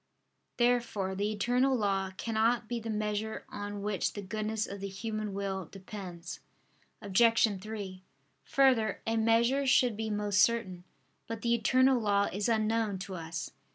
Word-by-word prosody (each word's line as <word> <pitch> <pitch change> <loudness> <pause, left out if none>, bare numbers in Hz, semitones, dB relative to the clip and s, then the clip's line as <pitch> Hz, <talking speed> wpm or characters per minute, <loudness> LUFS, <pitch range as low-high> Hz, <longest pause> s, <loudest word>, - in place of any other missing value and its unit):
Therefore 240 -6 +1
the 205 +2 -1
eternal 245 +5 +2
law 195 -3 0
cannot 225 +1 +1
be 240 0 -2
the 225 0 -6
measure 215 0 -2
on 205 0 -5
which 205 -3 -1
the 205 - -6
goodness 215 +2 -2
of 200 - -7
the 200 - -4
human 215 +1 -4
will 195 -1 -3
depends. 185 -3 -8 0.6
Obj. 210 0 +3
3: 200 -3 -6 0.4
Further, 255 -6 +3
a 225 - 0
measure 235 +5 +3
should 250 -3 +4
be 220 +1 -3
most 205 -2 +1
certain. 190 -5 +1 0.4
But 225 -1 -5
the 235 0 +2
eternal 255 +2 +3
law 200 -1 +2
is 205 +4 -1
unknown 220 -2 +1
to 190 +1 -7
us. 165 -2 -5
215 Hz, 150 wpm, -31 LUFS, 200-230 Hz, 0.6 s, should